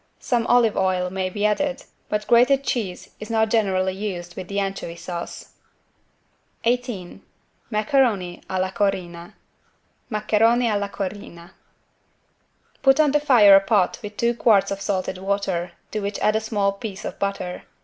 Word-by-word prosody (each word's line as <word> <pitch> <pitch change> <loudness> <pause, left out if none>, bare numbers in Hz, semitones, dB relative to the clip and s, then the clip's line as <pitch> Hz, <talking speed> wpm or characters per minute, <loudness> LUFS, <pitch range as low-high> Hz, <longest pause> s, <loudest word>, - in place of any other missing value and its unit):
Some 240 -2 -1
olive 235 -3 +4
oil 185 -1 0
may 190 0 -2
be 205 +3 -2
added, 265 +6 0 0.3
but 210 0 -1
grated 250 +3 +4
cheese 205 -10 -3
is 215 - -8
not 220 -1 +1
generally 190 -4 +1
used 185 -3 -5
with 185 -2 -7
the 200 0 -2
anchovy 195 -4 -4
sauce. 170 0 -7 1.1
18 235 -6 -2 0.5
MACARONI 215 -5 +1
A 190 - -1
LA 185 0 -1
CORINNA 175 -4 -2 0.8
(Maccheroni 225 +3 +2
alla 205 -2 -1
Corinna) 190 -4 -7 1.3
Put 270 +2 +4
on 300 -2 +4
the 295 - +3
fire 235 -9 +7
a - - +8
pot 195 -2 +1
with 210 -1 -8
two 235 0 +2
quarts 220 -5 +3
of 195 0 -4
salted 190 -2 -2
water 190 -3 -2 0.2
to 215 - -2
which 200 0 -3
add 215 - +1
a 220 - +1
small 205 -3 0
piece 200 0 -7
of - - -6
butter. 195 -2 -3
205 Hz, 150 wpm, -23 LUFS, 185-225 Hz, 1.3 s, a